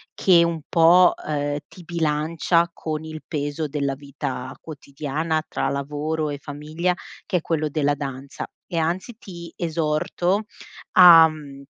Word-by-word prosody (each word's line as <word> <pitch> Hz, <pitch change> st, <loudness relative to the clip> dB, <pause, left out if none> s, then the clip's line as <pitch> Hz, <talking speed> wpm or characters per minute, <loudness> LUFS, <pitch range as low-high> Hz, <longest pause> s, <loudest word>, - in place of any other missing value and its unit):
che 175 Hz, -3 st, +5 dB
un 170 Hz, -1 st, -1 dB
po', 175 Hz, +2 st, +5 dB
ehm, 145 Hz, -1 st, -1 dB
ti 180 Hz, -, -14 dB
bilancia 165 Hz, +1 st, +1 dB
con 155 Hz, -1 st, -5 dB
il 155 Hz, 0 st, -8 dB
peso 145 Hz, 0 st, -3 dB
della 140 Hz, -1 st, -2 dB
vita 135 Hz, -2 st, -6 dB
quotidiana 155 Hz, +1 st, -3 dB
tra 135 Hz, -, -2 dB
lavoro 150 Hz, +3 st, -2 dB
e 145 Hz, -, -4 dB
famiglia 155 Hz, +5 st, -2 dB, 0.3 s
che 180 Hz, -, +1 dB
è -, -, -2 dB
quello 155 Hz, -2 st, -1 dB
della 145 Hz, -1 st, +1 dB
danza 135 Hz, -1 st, -6 dB, 0.2 s
e, 175 Hz, -, -4 dB
anzi, 175 Hz, +8 st, -2 dB
ti 170 Hz, -5 st, -10 dB
esorto 170 Hz, +4 st, -1 dB, 0.5 s
a, 170 Hz, -3 st, +9 dB
mhmm, 145 Hz, -3 st, -10 dB
155 Hz, 140 wpm, -23 LUFS, 145-170 Hz, 0.5 s, a